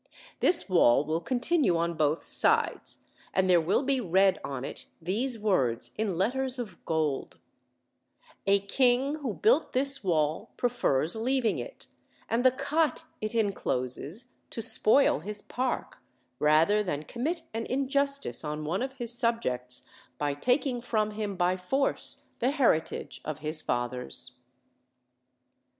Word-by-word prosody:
This 355 - +4
wall 150 - +4
will 160 +2 -1
continue 255 - +1
on 170 +1 0
both 155 0 0
sides, - - +1 0.3
and 190 0 +3
there 175 -2 +5
will 180 - +1
be 270 -1 +1
read 190 0 +3
on 135 -2 -4
it - - -8
these 225 +9 -2
words 135 - 0
in 205 -5 -2
letters 260 +7 0
of 210 -8 -7
gold: 155 -4 -1 1.1
'A 200 0 +4
king 250 +6 +2
who 255 -8 -3
built 450 +4 +2
this 275 0 0
wall 160 +3 0
prefers 175 - +1
leaving 245 +1 0
it, - - -8 0.4
and 235 +2 0
the 260 - +7
cot 285 +5 0 0.2
it 215 +2 -3
in 210 -3 +2
closes, 145 - -2 0.2
to - - -6
spoil 225 - +4
his 205 +5 -5
park, 255 +1 -3 0.4
rather 160 +8 +4
than 155 -7 -3
commit 315 - -3
an 225 0 -3
injustice 280 -1 0
on 150 0 -4
one 175 +8 -1
of 265 +1 -3
his 240 -3 -2
subjects 125 - -1 0.3
by 145 +1 -1
taking 245 - 0
from 215 -3 0
him 210 -2 -4
by 180 0 +2
force 265 +10 0
the 250 - +2
heritage 265 - 0
of 155 -2 -4
his 155 +1 -1
fathers.' 125 +1 0
210 Hz, 140 wpm, -28 LUFS, 160-255 Hz, 1.1 s, the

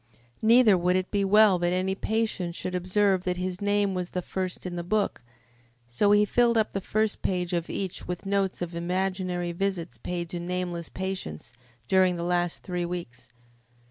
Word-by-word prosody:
Neither 220 -3 +6
would 180 +1 +2
it 185 0 -1
be 200 -1 +1
well 205 -1 +5
that 175 0 +1
any 185 +1 0
patient 205 -4 -1
should 180 - -4
observe 185 +1 +2
that 180 -1 -1
his 180 +1 -3
name 205 -1 +1
was 180 -1 -3
the 180 - -3
first 185 0 -4
in 180 -1 -4
the 175 - -3
book, 205 -2 0 0.7
so 120 - +1
he 210 0 +5
filled 235 +1 +3
up 220 - +2
the 195 - -2
first 215 +2 0
page 180 -1 -1
of 170 -1 -1
each 190 -3 -4
with 180 +2 -5
notes 195 -2 0
of 175 0 -6
imaginary 180 0 -1
visits 180 -1 -3
paid 175 -1 -3
to 175 - -4
nameless 175 -1 -3
patients 185 - -5 0.3
during 185 +1 +4
the 170 - -4
last 175 0 0
three 180 -2 -2
weeks. 125 -9 -6
185 Hz, 180 wpm, -27 LUFS, 175-195 Hz, 0.7 s, Neither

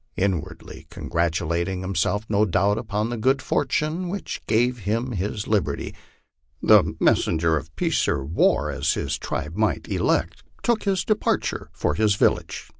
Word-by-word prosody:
Inwardly 95 -3 -3
congratulating 85 +2 -1
himself, 95 +3 -1
no 105 0 +2
doubt, 100 +1 +2
upon 110 0 -2
the 120 - -3
good 130 +5 +2
fortune 160 +6 -1
which 200 +2 -5
gave 120 +3 +2
him 115 +5 -1
his 105 +1 -3
liberty, 95 -10 -1 0.7
the - - +5
messenger 80 0 +2
of 80 0 -5
peace - - +1
or 65 - 0
war, 80 +5 +2
as - - 0
his - - -2
tribe 75 +4 -4
might 110 +1 0
elect, - - 0 0.2
took 235 -3 +1
his 190 -3 +1
departure 215 -1 0
for - - -1
his 105 +5 +2
village. - - 0
105 Hz, 145 wpm, -24 LUFS, 85-120 Hz, 0.7 s, the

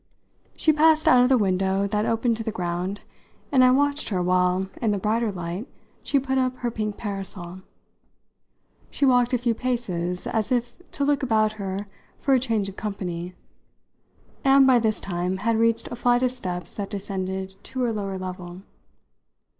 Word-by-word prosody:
She 310 - +3
passed 310 +1 +4
out 250 - +7
of 250 - +4
the 265 - +5
window 190 -1 +1
that 210 +1 0
opened 230 +1 +1
to 225 - -4
the 220 - -2
ground, 180 +1 -3 0.5
and 260 -3 +5
I 255 - +7
watched 285 +3 +1
her 190 -4 0
while, 180 +1 +2
in 225 - +1
the 205 - +1
brighter 220 +3 0
light, 180 - -5 0.3
she 280 - +1
put 265 0 0
up 255 0 0
her 240 -1 -3
pink 215 -2 -3
parasol. 190 -3 -6 1.3
She 280 - 0
walked 245 -2 +4
a 250 - +3
few 240 -1 0
paces, 185 -8 -2
as 220 0 -1
if 240 +1 -1
to 280 - -1
look 290 0 +2
about 220 -4 +2
her 200 -1 -4 0.3
for 275 - +2
a 260 - +5
change 225 -5 0
of 195 - -8
company, 180 -4 -5 1.1
and 270 0 +6
by 255 -2 +6
this 220 -1 0
time 180 0 -2
had 225 +3 0
reached 230 0 +2
a - - -3
flight 245 +1 +2
of 250 - +2
steps 180 -9 -5
that 200 -2 -5
descended 190 -1 -4
to 255 -1 -2
a 230 - 0
lower 195 -2 -3
level. 185 0 -7
215 Hz, 180 wpm, -24 LUFS, 190-245 Hz, 1.3 s, out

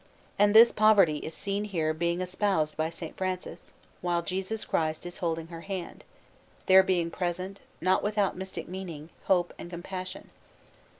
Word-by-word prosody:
And 205 +1 +4
this 230 +1 +9
Poverty 205 -8 +5
is 160 - -7
seen 200 0 -2
here 165 -6 0
being 170 +2 -1
espoused 180 -4 0
by 155 0 0
S. 170 +2 -8
Francis, 185 -1 -4 0.3
while 175 -1 0
Jesus 190 +5 -3
Christ 155 +1 -1
is 175 - -6
holding 165 -3 -2
her 165 -1 -8
hand, 185 -2 -6 0.6
there 190 0 +8
being 175 -3 0
present, 185 +2 -3 0.2
not 185 +2 +3
without 205 -2 0
mystic 190 +1 -6
meaning, 170 -4 -7
Hope 175 -2 +2
and 175 - -7
Compassion. 185 +1 -7
180 Hz, 155 wpm, -28 LUFS, 170-195 Hz, 0.6 s, this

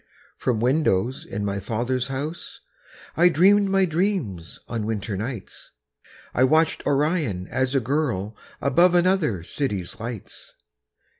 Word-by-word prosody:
From 120 -4 -1
windows 125 -2 +1
in 100 +1 -4
my 100 0 -2
father's 120 +5 -2
house, 145 +5 -5 0.6
Dreaming 185 +4 +5
my 195 0 +3
dreams 160 - -2
on 110 -3 -3
winter 105 -2 -3
nights, 110 0 -7 0.6
I 130 - +3
watched 155 +4 +3
Orion 145 - 0
as 130 +2 0
a - - +5
girl 120 -6 -1 0.3
Above 175 +6 +4
another 175 - +2
city's 100 - -3
lights. 115 -2 -8
130 Hz, 120 wpm, -24 LUFS, 105-160 Hz, 0.6 s, Dreaming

